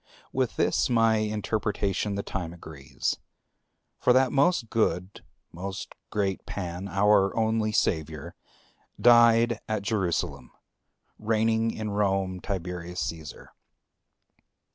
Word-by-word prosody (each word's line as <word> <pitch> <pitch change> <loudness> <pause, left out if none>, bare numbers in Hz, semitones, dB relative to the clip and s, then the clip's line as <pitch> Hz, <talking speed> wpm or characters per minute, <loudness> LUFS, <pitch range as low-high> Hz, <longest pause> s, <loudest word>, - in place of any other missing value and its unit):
With - - 0
this - - +1
my 115 -2 +4
interpretation 105 -2 -1
the 100 - -3
time 85 -3 -4
agrees. 75 -6 -4 0.8
For 125 - +4
that 130 0 +4
most 140 -4 +2
good, 100 -4 -1 0.3
most 95 +3 -6 0.2
great 100 -2 -1
Pan, 90 0 -5
our 100 +1 +3
only 110 -1 +1
Savior, 80 -7 -1 0.7
died 115 -1 +5
at 110 -2 -1
Jerusalem, 95 - -2 0.7
reigning 110 +1 +1
in 110 -2 -4
Rome 95 -2 0
Tiberius 90 -1 -5
Caesar. 80 -2 -6
100 Hz, 100 wpm, -27 LUFS, 90-110 Hz, 0.8 s, died